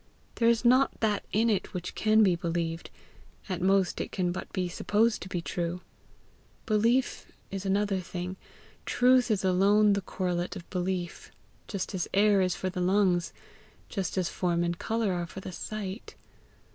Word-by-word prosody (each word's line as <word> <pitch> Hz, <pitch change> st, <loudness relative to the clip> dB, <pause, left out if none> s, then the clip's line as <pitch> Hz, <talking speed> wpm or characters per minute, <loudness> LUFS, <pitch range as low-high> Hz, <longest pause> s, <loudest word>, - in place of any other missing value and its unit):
There 230 Hz, -1 st, +4 dB
is 235 Hz, +1 st, +1 dB
not 255 Hz, +3 st, +4 dB
that 210 Hz, -2 st, +1 dB
in 225 Hz, +3 st, +2 dB
it 210 Hz, -2 st, -1 dB
which 180 Hz, -1 st, -4 dB
can 220 Hz, 0 st, +4 dB
be 185 Hz, -4 st, +4 dB
believed; 170 Hz, -1 st, -3 dB, 0.6 s
at 185 Hz, -3 st, -3 dB
most 190 Hz, 0 st, +2 dB
it -, -, -5 dB
can 180 Hz, -2 st, 0 dB
but 180 Hz, -, -6 dB
be 185 Hz, -2 st, -1 dB
supposed 215 Hz, +6 st, +1 dB
to 185 Hz, -, -7 dB
be 175 Hz, -2 st, -3 dB
true. 175 Hz, +1 st, -3 dB, 0.8 s
Belief 230 Hz, +4 st, +1 dB, 0.2 s
is 195 Hz, 0 st, -4 dB
another 200 Hz, 0 st, +1 dB
thing. 180 Hz, +1 st, -5 dB, 0.5 s
Truth 250 Hz, 0 st, +4 dB
is 210 Hz, -3 st, +1 dB
alone 200 Hz, +3 st, +4 dB
the 200 Hz, -, 0 dB
correlate 180 Hz, 0 st, -2 dB
of 180 Hz, -3 st, -9 dB
belief, 180 Hz, -1 st, -3 dB, 0.4 s
just 195 Hz, -1 st, -4 dB
as 185 Hz, -3 st, -2 dB
air 205 Hz, -1 st, +5 dB
is 185 Hz, -1 st, +1 dB
for 185 Hz, -, -3 dB
the 180 Hz, -1 st, -3 dB
lungs, 180 Hz, -2 st, +2 dB, 0.6 s
just 195 Hz, -3 st, -3 dB
as 185 Hz, -2 st, +1 dB
form 175 Hz, -1 st, 0 dB
and 170 Hz, 0 st, -2 dB
colour 225 Hz, -3 st, 0 dB
are 175 Hz, -1 st, -2 dB
for 190 Hz, -, -9 dB
the 185 Hz, -, -7 dB
sight. 205 Hz, +2 st, -6 dB
190 Hz, 170 wpm, -28 LUFS, 180-210 Hz, 0.8 s, air